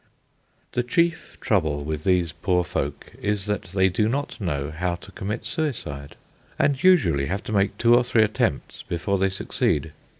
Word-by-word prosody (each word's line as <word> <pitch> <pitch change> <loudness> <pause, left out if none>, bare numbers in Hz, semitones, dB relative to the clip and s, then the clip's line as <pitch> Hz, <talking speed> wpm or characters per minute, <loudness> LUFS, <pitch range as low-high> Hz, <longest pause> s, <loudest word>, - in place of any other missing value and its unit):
The 125 - +1
chief 170 +4 0
trouble 80 - +1
with 75 0 -4
these 90 -3 +2
poor 90 +4 0
folk 75 -5 -4
is 105 -2 0
that 105 0 -1
they 95 +1 +2
do 105 +4 +1
not 140 -1 -3
know 75 -6 -2
how 85 +3 -1
to 85 - -13
commit 105 +4 -4
suicide, 85 - -3 0.4
and 140 -2 +2
usually 90 - +4
have 100 +3 -3
to - - -6
make 100 -1 +1
two 115 0 +4
or 120 - +4
three 120 -2 +3
attempts 110 0 -1
before 95 +3 -2
they 95 0 +3
succeed. 95 -4 -1
95 Hz, 170 wpm, -24 LUFS, 80-115 Hz, 0.4 s, usually